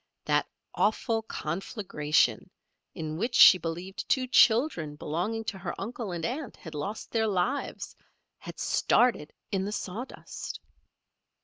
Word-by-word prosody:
That -, -, +2 dB, 0.3 s
awful 225 Hz, +1 st, +1 dB
conflagration, 170 Hz, -5 st, -1 dB, 0.5 s
in 155 Hz, -1 st, -4 dB
which 235 Hz, +6 st, -1 dB
she 185 Hz, -, +9 dB
believed 175 Hz, +3 st, -5 dB
two 260 Hz, -1 st, +2 dB
children 230 Hz, -, +3 dB
belonging 180 Hz, +10 st, -2 dB
to 200 Hz, -3 st, -5 dB
her 185 Hz, -3 st, -5 dB
uncle 220 Hz, 0 st, -5 dB
and 170 Hz, -2 st, -3 dB
aunt 260 Hz, 0 st, -4 dB
had 160 Hz, -, -10 dB
lost 150 Hz, +9 st, -5 dB
their 220 Hz, -1 st, +1 dB
lives, 210 Hz, +8 st, -2 dB, 0.4 s
had -, -, -9 dB
started 235 Hz, -11 st, +2 dB, 0.2 s
in 190 Hz, -1 st, 0 dB
the 200 Hz, -, -3 dB
sawdust. 215 Hz, +4 st, -6 dB
195 Hz, 125 wpm, -28 LUFS, 165-230 Hz, 0.5 s, she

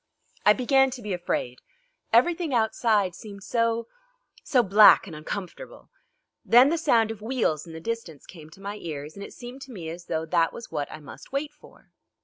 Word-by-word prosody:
I 210 Hz, -, +9 dB
began 270 Hz, +3 st, +3 dB
to 255 Hz, -1 st, -8 dB
be 205 Hz, -2 st, -3 dB
afraid; 125 Hz, -8 st, -3 dB, 0.5 s
everything 315 Hz, +4 st, +2 dB
outside 220 Hz, -4 st, +1 dB
seemed 200 Hz, +1 st, -11 dB
so 230 Hz, 0 st, 0 dB, 0.6 s
so 250 Hz, -3 st, +3 dB
black 205 Hz, +1 st, +7 dB
and 170 Hz, -5 st, -9 dB
uncomfortable. 185 Hz, -, -8 dB, 0.5 s
Then 245 Hz, +4 st, +6 dB
the 335 Hz, -, 0 dB
sound 230 Hz, -8 st, +3 dB
of 215 Hz, -2 st, -9 dB
wheels 220 Hz, -, -1 dB
in 165 Hz, -, -10 dB
the 160 Hz, -, -7 dB
distance 205 Hz, -7 st, -6 dB
came 155 Hz, -4 st, -13 dB
to 190 Hz, -, -17 dB
my 200 Hz, +1 st, -5 dB
ears, 150 Hz, -4 st, -7 dB
and 200 Hz, -, -9 dB
it -, -, -9 dB
seemed 245 Hz, +2 st, -10 dB
to 265 Hz, -, -10 dB
me 175 Hz, -8 st, -7 dB
as 175 Hz, +1 st, -10 dB
though 160 Hz, -1 st, -2 dB
that 165 Hz, -1 st, +1 dB
was 235 Hz, -, -10 dB
what 145 Hz, -, -3 dB
I -, -, -8 dB
must 145 Hz, -, -13 dB
wait 290 Hz, +2 st, -3 dB
for. -, -, -20 dB
210 Hz, 190 wpm, -26 LUFS, 170-245 Hz, 0.6 s, I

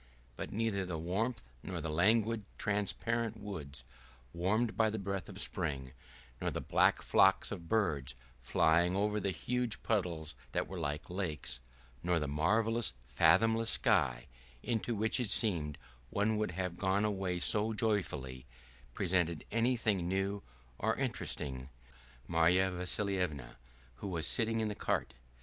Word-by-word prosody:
But -, -, -6 dB
neither 105 Hz, -3 st, 0 dB
the 90 Hz, -3 st, -4 dB
warmth 100 Hz, -, -2 dB, 0.2 s
nor 90 Hz, -2 st, -5 dB
the 80 Hz, 0 st, -3 dB
languid 110 Hz, +6 st, +3 dB
transparent 110 Hz, +2 st, -1 dB
woods, 75 Hz, -, -6 dB, 0.5 s
warmed 105 Hz, +7 st, 0 dB
by 110 Hz, -1 st, +3 dB
the 110 Hz, -, -3 dB
breath 100 Hz, -1 st, -4 dB
of -, -, -8 dB
spring, 65 Hz, -5 st, -1 dB, 0.5 s
nor -, -, 0 dB
the -, -, -3 dB
black -, -, +2 dB
flocks -, -, +4 dB
of 85 Hz, -1 st, -7 dB
birds 75 Hz, -, 0 dB, 0.3 s
flying 85 Hz, +8 st, +3 dB
over 105 Hz, +1 st, +1 dB
the 100 Hz, -, -1 dB
huge 125 Hz, +6 st, -2 dB
puddles 85 Hz, -, -1 dB, 0.2 s
that -, -, 0 dB
were 95 Hz, -, -6 dB
like 75 Hz, +1 st, -3 dB
lakes, 80 Hz, -9 st, -3 dB, 0.4 s
nor 90 Hz, -1 st, +1 dB
the 75 Hz, -, -2 dB
marvelous 110 Hz, -, +1 dB, 0.2 s
fathomless 115 Hz, -, +4 dB
sky, -, -, +3 dB, 0.4 s
into 115 Hz, -1 st, -1 dB
which 110 Hz, +4 st, 0 dB
it 120 Hz, -4 st, 0 dB
seemed 85 Hz, -, +1 dB, 0.3 s
one 105 Hz, -, +1 dB
would 105 Hz, -4 st, -1 dB
have 90 Hz, -1 st, -3 dB
gone 100 Hz, +2 st, +2 dB
away 95 Hz, -3 st, -1 dB
so 105 Hz, +5 st, +5 dB
joyfully, 75 Hz, -, -1 dB, 0.5 s
presented 85 Hz, -4 st, 0 dB
anything 115 Hz, -5 st, +1 dB
new 95 Hz, +2 st, -1 dB, 0.4 s
or -, -, +1 dB
interesting 65 Hz, -3 st, -3 dB
to 65 Hz, +1 st, -11 dB, 0.6 s
Marya 90 Hz, +3 st, +3 dB
Vassilyevna 90 Hz, -5 st, -2 dB, 0.4 s
who 100 Hz, -, -6 dB
was 85 Hz, -4 st, -1 dB
sitting 115 Hz, -1 st, +2 dB
in 110 Hz, -, 0 dB
the 105 Hz, -, -2 dB
cart. -, -, -1 dB
95 Hz, 140 wpm, -33 LUFS, 80-110 Hz, 0.6 s, so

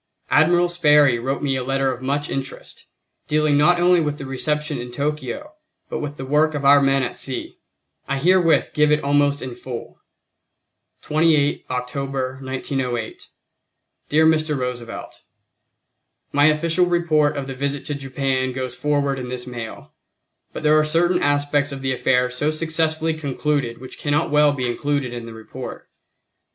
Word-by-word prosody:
Admiral 175 Hz, +3 st, +4 dB
Sperry 150 Hz, -7 st, +4 dB
wrote 135 Hz, +4 st, -3 dB
me 135 Hz, -2 st, +1 dB
a 130 Hz, -, -2 dB
letter 135 Hz, +1 st, 0 dB
of 125 Hz, 0 st, -7 dB
much 145 Hz, +3 st, -1 dB
interest, 135 Hz, 0 st, -6 dB, 0.4 s
dealing 150 Hz, -1 st, +2 dB
not 175 Hz, +5 st, +4 dB
only 175 Hz, 0 st, +4 dB
with 150 Hz, -2 st, -2 dB
the 140 Hz, -, -7 dB
reception 150 Hz, +2 st, -2 dB
in 120 Hz, 0 st, -7 dB
Tokyo 150 Hz, -, -4 dB, 0.4 s
but -, -, -2 dB
with 145 Hz, 0 st, -5 dB
the 135 Hz, -, -6 dB
work 150 Hz, +3 st, +2 dB
of 140 Hz, -1 st, -3 dB
our 140 Hz, 0 st, +7 dB
men 135 Hz, -1 st, +2 dB
at 125 Hz, -, -3 dB
sea; 130 Hz, -2 st, -5 dB, 0.5 s
I 140 Hz, -, -1 dB
herewith 175 Hz, +2 st, +3 dB
give 150 Hz, 0 st, +3 dB
it 150 Hz, -, +2 dB
almost 145 Hz, 0 st, +2 dB
in 130 Hz, -2 st, -5 dB
full: 120 Hz, 0 st, -8 dB, 1.0 s
28 150 Hz, -2 st, +2 dB
October, 130 Hz, +1 st, -3 dB
1908. 130 Hz, -3 st, -4 dB, 0.8 s
Dear 155 Hz, +2 st, +4 dB
Mr. 155 Hz, -2 st, +2 dB
Roosevelt: 125 Hz, -2 st, -6 dB, 1.1 s
My 145 Hz, +1 st, +4 dB
official 165 Hz, +3 st, +2 dB
report 155 Hz, -4 st, +2 dB
of 140 Hz, -, -3 dB
the 135 Hz, -, -6 dB
visit 140 Hz, +1 st, -3 dB
to 145 Hz, -, -3 dB
Japan 135 Hz, -2 st, -2 dB
goes 130 Hz, -1 st, -4 dB
forward 140 Hz, 0 st, 0 dB
in 125 Hz, -, -5 dB
this 125 Hz, 0 st, -5 dB
mail, 120 Hz, -3 st, -8 dB, 0.6 s
but -, -, -7 dB
there 155 Hz, 0 st, +5 dB
are -, -, +3 dB
certain 175 Hz, +4 st, +2 dB
aspects 145 Hz, 0 st, +1 dB
of 135 Hz, -1 st, -7 dB
the 135 Hz, -, 0 dB
affair 125 Hz, 0 st, +1 dB
so 135 Hz, +4 st, 0 dB
successfully 160 Hz, 0 st, 0 dB
concluded 145 Hz, -4 st, -2 dB
which 130 Hz, 0 st, -11 dB
cannot 145 Hz, +2 st, 0 dB
well 150 Hz, 0 st, +5 dB
be 130 Hz, -3 st, -2 dB
included 140 Hz, +1 st, -1 dB
in 120 Hz, -1 st, -6 dB
the 115 Hz, -, -9 dB
report. 110 Hz, 0 st, -9 dB
145 Hz, 160 wpm, -21 LUFS, 130-155 Hz, 1.1 s, our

